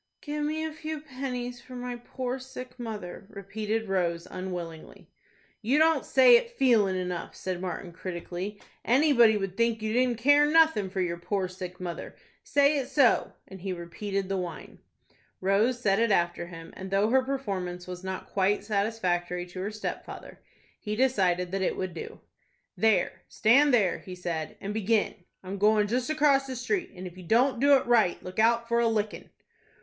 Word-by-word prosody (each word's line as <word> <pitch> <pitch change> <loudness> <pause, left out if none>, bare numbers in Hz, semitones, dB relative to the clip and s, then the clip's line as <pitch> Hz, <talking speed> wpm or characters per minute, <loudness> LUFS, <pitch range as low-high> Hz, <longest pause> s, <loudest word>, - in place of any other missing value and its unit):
"Give 295 0 -3
me 310 +1 -1
a 315 - -3
few 315 0 -5
pennies 255 -4 -5
for 255 - -11
my 245 0 -4
poor 250 +2 -5
sick 255 -1 -10
mother," 210 -5 -6
repeated 215 +2 -3
Rose, 175 -3 0
unwillingly. 175 -3 -7 0.5
"You 245 +6 +2
don't 320 +1 +4
say - - +7
it 475 0 -3
feelin' 220 -8 +4
enough," 180 -2 -4
said 185 -1 -4
Martin, 180 -1 -5
critically. 185 +3 -6 0.2
"Anybody 240 -4 +5
would 195 -2 -4
think 230 +1 +1
you 215 0 -2
didn't 250 -1 +2
care 290 +5 +5
nothin' 315 -11 +4
for 190 0 -2
your 170 -1 -1
poor 190 +2 -1
sick 180 0 -8
mother. 175 -2 -6 0.3
Say 285 +1 +3
it 265 - -3
so;" 275 -5 +3
and 190 -2 -11
he 190 0 -3
repeated 195 +3 -4
the 195 0 -1
whine. 175 -3 -6 0.6
Rose 210 +6 +2
said 200 -4 +2
it 230 0 +3
after 175 -3 +1
him, 165 -1 -10
and 190 0 -7
though 200 +3 +2
her 265 +1 +5
performance 195 -10 -4
was 180 0 -8
not 190 0 -5
quite 195 +1 +1
satisfactory 185 -4 -1
to 180 +1 -9
her 200 - -2
stepfather, 215 0 -7 0.4
he 210 -1 -4
decided 185 -8 +1
that 195 0 -1
it 190 - 0
would 185 -2 -3
do. 165 - -8 0.5
"There, 220 -2 +2
stand 280 +7 +4
there," 210 -8 +3
he 185 - -9
said, 170 -3 -4
"and 200 +1 -4
begin. 220 0 +1 0.3
I'm 190 +1 -6
goin' 210 0 +4
just 245 +4 -1
across 290 -3 +3
the 260 - -5
street, 355 - -1
and 185 +1 -8
if 180 0 -9
you - - -10
don't 235 +7 +2
do 280 +2 +6
it 265 - +1
right, 225 -7 +3
look 185 +3 -6
out 235 +1 +3
for 235 0 +2
a 235 - +3
lickin'." 215 -2 -2
210 Hz, 180 wpm, -28 LUFS, 185-250 Hz, 0.6 s, say